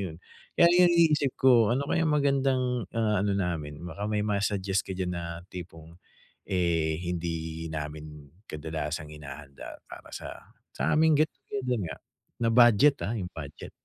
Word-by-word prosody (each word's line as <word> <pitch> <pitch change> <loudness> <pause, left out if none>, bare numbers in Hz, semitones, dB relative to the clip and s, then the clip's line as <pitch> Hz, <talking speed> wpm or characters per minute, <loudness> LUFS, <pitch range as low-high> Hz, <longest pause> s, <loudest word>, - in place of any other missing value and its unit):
iyon. 80 - -10 0.4
Kaya 170 - +7
'yong 180 0 +6
iniisip 155 -5 +3
ko 120 -5 +5
ano 140 +2 -1
kaya 165 -1 +1
magandang, 135 - +1
ah, 110 -3 +2
ano 100 -1 +1
namin? 80 -6 -2
Baka 95 +5 -5
may 105 -1 0
ma-suggest 100 -2 0
ka 95 - -4
diyan 90 -1 -2
na 85 -1 -4 0.3
tipong, 85 -2 -10 0.5
eh, 85 -4 +1
hindi 80 -2 -4
namin 75 -1 -7 0.2
kadalasang 75 0 -4
hinahanda 70 -2 -10
para - - -11
sa - - -8 0.4
sa - - 0
aming 160 0 +5
get 155 - +4
together 125 -3 -3
nga, - - -6 0.4
na 115 -1 +2
budget, 120 +4 +6
ah, 110 - -2
'yong 90 -3 -4
budget. 75 -3 -8
95 Hz, 150 wpm, -28 LUFS, 80-125 Hz, 0.5 s, Kaya